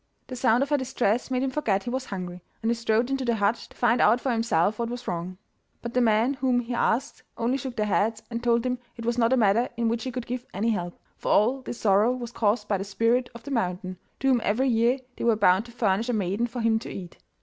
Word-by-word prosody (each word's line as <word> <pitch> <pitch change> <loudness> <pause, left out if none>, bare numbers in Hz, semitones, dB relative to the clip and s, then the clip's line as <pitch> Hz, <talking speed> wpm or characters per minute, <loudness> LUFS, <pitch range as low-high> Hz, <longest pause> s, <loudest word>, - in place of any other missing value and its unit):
The 255 - -7
sound 245 0 +3
of 275 - -4
her 295 - +3
distress 250 -3 0
made 255 0 0
him 270 - -1
forget 210 -9 0
he 240 - -4
was 260 +1 -2
hungry, 180 -4 -6 0.2
and 225 - +2
he - - +3
strode 235 +2 0
into 270 -1 -1
the 235 -2 +1
hut 215 +2 0
to - - -19
find 240 -1 +3
out 225 +4 +5
for 260 - -1
himself 220 -3 +1
what 235 -1 -1
was 245 +1 -6
wrong. 175 +2 -4 0.5
But 235 0 -5
the 250 - +2
men 225 +3 +3
whom 260 -2 +1
he 240 +1 -5
asked 245 +3 0 0.2
only 235 +3 0
shook 260 -2 -6
their 215 -3 0
heads 220 +2 0
and 235 0 -4
told 235 0 +2
him 250 -1 -1 0.2
it 230 - -7
was 235 +1 0
not 230 0 +3
a 260 - +4
matter 225 +2 +3
in 235 -1 +1
which 230 0 -2
he 260 - -3
could 250 -1 -5
give 250 0 -5
any 220 +4 +1
help, 175 -4 -3 0.2
for - - -2
all 250 +6 +3
this 245 - -7
sorrow 210 +3 +4
was 240 -2 -6
caused 210 -1 0
by 200 -2 0
the - - -2
Spirit 230 +5 +1
of 235 - -10
the 285 - -7
Mountain, 185 -5 -2 0.2
to 270 - +2
whom 250 -3 +3
every 255 +6 +1
year 235 +2 +3 0.2
they - - -5
were 235 -1 +4
bound 200 0 +3
to - - -12
furnish 225 0 0
a - - +1
maiden 205 +2 0
for 240 +1 -5
him 225 -1 +2
to - - -8
eat. 180 -3 -8
235 Hz, 265 wpm, -26 LUFS, 210-250 Hz, 0.5 s, out